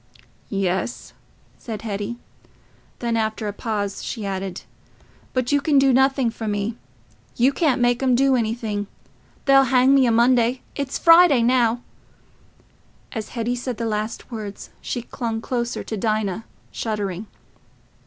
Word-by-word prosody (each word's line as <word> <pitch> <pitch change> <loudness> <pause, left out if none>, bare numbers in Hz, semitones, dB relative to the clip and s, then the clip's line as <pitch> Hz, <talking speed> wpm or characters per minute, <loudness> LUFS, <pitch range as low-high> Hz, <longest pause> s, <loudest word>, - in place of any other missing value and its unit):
"Yes," 195 +3 -2 0.5
said 220 -3 -6
Hetty. 210 +2 -4 0.8
Then, 235 -1 -1
after 220 -1 -1
a 205 - -3
pause, 205 -2 -3
she 220 -4 -4
added, 190 -1 -4 0.7
"But 255 0 -1
you 285 0 +3
can 290 0 +2
do 270 -1 +5
nothing 265 -2 +3
for 225 -1 -6
me. 205 +2 -1 0.6
You 255 +4 +3
can't 275 -4 +2
make 245 +1 +2
'em 255 -2 +3
do 270 +1 +4
anything. 220 -3 -2 0.6
They'll 270 -1 +6
hang 260 +1 +4
me 270 -2 +5
o' - - +3
Monday—it's 245 +3 +1
Friday 330 -7 +6
now." 240 -1 +2 1.3
As 220 -4 -5
Hetty 235 +1 0
said 245 -1 -4
the 230 - -2
last 215 +2 -3
words, 210 -3 -7
she 240 - -4
clung 230 -3 -4
closer 240 0 -3
to 220 - -5
Dinah, 215 -1 -1 0.3
shuddering. 210 -2 -3
235 Hz, 135 wpm, -22 LUFS, 215-255 Hz, 1.3 s, They'll